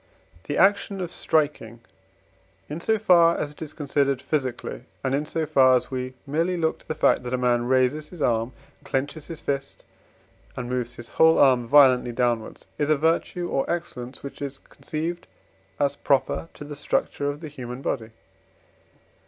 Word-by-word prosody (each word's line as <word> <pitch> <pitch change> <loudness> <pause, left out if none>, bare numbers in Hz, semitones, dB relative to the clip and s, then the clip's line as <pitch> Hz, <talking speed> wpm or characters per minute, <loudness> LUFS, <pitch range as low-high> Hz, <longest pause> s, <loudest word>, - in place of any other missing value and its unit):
The 145 - -2
action 200 +1 +3
of 175 -2 -4
striking, 145 -10 -1 0.9
in 155 +3 -6
so 220 +5 +2
far 170 -5 +5
as 145 - -3
it 150 - -17
is 155 -2 -5
considered 140 -3 0
physically, 130 -3 -3 0.2
and 130 -1 0
in 145 +2 0
so 160 0 -1
far 130 -4 +5
as 125 - -1
we 130 0 -4
merely 165 +5 0
look 160 -1 0
to - - -20
the 155 - -3
fact - - +3
that 125 0 -2
a - - -1
man 120 -1 +1
raises 130 +4 +2
his 180 - -11
arm, 115 -3 +1 0.3
clenches 145 +3 -3
his 165 -2 -8
fist, 140 -1 -4 0.7
and 125 -1 -4
moves 125 -1 -3
his 120 -1 -9
whole 160 0 +5
arm 125 -4 +4
violently 130 -3 +5
downwards, 120 -2 -1
is 145 0 +1
a 155 - +4
virtue 165 +3 0
or 135 - -1
excellence 140 -7 -4
which 140 - -8
is 140 -1 -4
conceived 165 +5 -5 0.5
as 145 -1 +1
proper 140 +4 0
to - - -9
the 145 0 -7
structure 145 0 -1
of 145 +2 -5
the 160 - -6
human 130 -3 -8
body. 110 -4 -2
140 Hz, 175 wpm, -25 LUFS, 125-160 Hz, 0.9 s, far